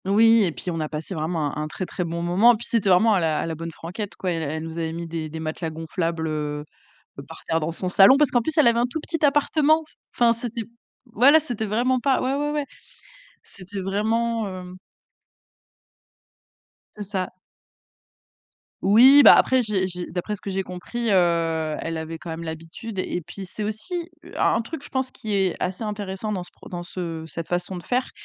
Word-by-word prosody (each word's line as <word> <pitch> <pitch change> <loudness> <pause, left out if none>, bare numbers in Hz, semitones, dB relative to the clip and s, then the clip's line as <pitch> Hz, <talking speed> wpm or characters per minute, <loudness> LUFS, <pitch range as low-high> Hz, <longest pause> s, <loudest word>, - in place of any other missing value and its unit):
Oui, 225 +3 +5
et 175 - 0
puis 180 - -5
on 165 - -3
a 155 -1 -2
passé 155 +4 -5
vraiment 155 -3 -2
un 150 - -3
un - - -3
très, 185 +4 -5
très 180 - -4
bon 170 0 -4
moment, 195 +8 +5
et - - -2
puis 230 - -3
c'était 220 -4 +1
vraiment 215 +5 +5
à 195 - +3
«à 160 -3 0
la 165 - -3
bonne 165 +1 -6
franquette», 180 +6 -6
quoi. 185 - -2
Elle 160 -1 -3
nous 165 +1 -6
avait 160 -1 -2
mis 170 +1 -5
des 160 -1 -5
des 160 +1 -7
matelas 160 +1 -4
gonflables, 165 +1 -3
heu, 150 -1 -3 0.6
par - - -12
terre 165 - +1
dans 160 +1 -2
son 185 +2 -4
salon, 195 +8 +7
parce 295 -2 +3
qu'en 245 - +3
plus, 315 +8 -3
elle 305 - +6
avait 235 0 +4
un 240 - +2
tout 315 - -3
petit 325 0 -3
appartement. 295 +2 +3 0.3
Enfin, 235 -1 +4
c'était 235 0 -5 0.4
voilà, 255 +7 +6
c'était 240 -8 -4
vraiment 245 +5 +1
pas 265 0 +2
ouais, 260 +1 0
ouais, 295 +1 -1
ouais. 295 -1 -1 0.8
C'était 195 +1 -8
vraiment, 220 +4 0
heu 185 -1 -8 2.2
C'est 210 - -4
ça. 190 -3 -2 1.5
Oui, 250 +9 +8
bah, - - +10
après 260 0 +4
j'ai 210 -5 0
j'ai 180 -1 -5
d'après 185 +4 -3
ce - - -12
que - - -6
j'ai 195 0 -1
compris, 215 +6 -4
heu, 165 -4 +1
elle 165 0 -3
avait 160 +1 -5
quand 165 +1 -8
même 160 +1 -5
l'habitude 165 +6 -7
et 180 -1 -2
puis 175 +4 -9
c'est 210 +4 -5
aussi 330 - -3 0.3
un - - +2
truc, 285 +5 -7
je - - -9
pense, 260 -1 -2
qui 220 -4 -5
est 190 -2 +1
assez 185 +4 -3
intéressant 205 -1 -4
dans 190 -3 -2
ce - - -14
pro - - -15
dans 175 -1 -6
ce 170 -2 -5
cette 165 +1 -6
façon 175 +1 -2
de 175 - -9
faire, 250 +1 -1
190 Hz, 205 wpm, -24 LUFS, 165-230 Hz, 2.2 s, bah